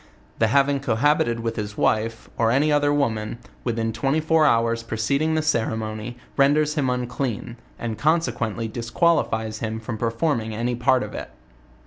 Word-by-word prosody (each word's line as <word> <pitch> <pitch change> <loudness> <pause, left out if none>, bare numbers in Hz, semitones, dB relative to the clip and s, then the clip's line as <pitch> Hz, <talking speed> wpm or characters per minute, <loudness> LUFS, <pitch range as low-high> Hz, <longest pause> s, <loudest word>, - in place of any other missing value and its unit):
The 115 - +4
having 140 +4 +3
cohabited 120 -2 +1
with 115 0 -3
his 105 -1 -4
wife, 115 +1 0
or 115 -1 +2
any 140 +6 +3
other 145 0 +3
woman, 115 -7 0 0.3
within 115 -2 -1
twenty 135 +7 +1
four 160 0 +3
hours 115 -2 +2
preceding 140 +8 0
the 155 - +1
ceremony, 110 -4 -2 0.2
renders 145 +2 +3
him 145 -4 0
unclean, 125 -2 -3 0.2
and, 110 -2 -4
consequently 120 -8 0
disquali 120 +10 +1
fies 110 -1 -3
him 110 0 -3
from 110 -1 -6
performing 115 -1 -1
any 120 +2 -1
part 125 +2 +2
of - - -7
it. - - -6
120 Hz, 155 wpm, -23 LUFS, 110-145 Hz, 0.3 s, The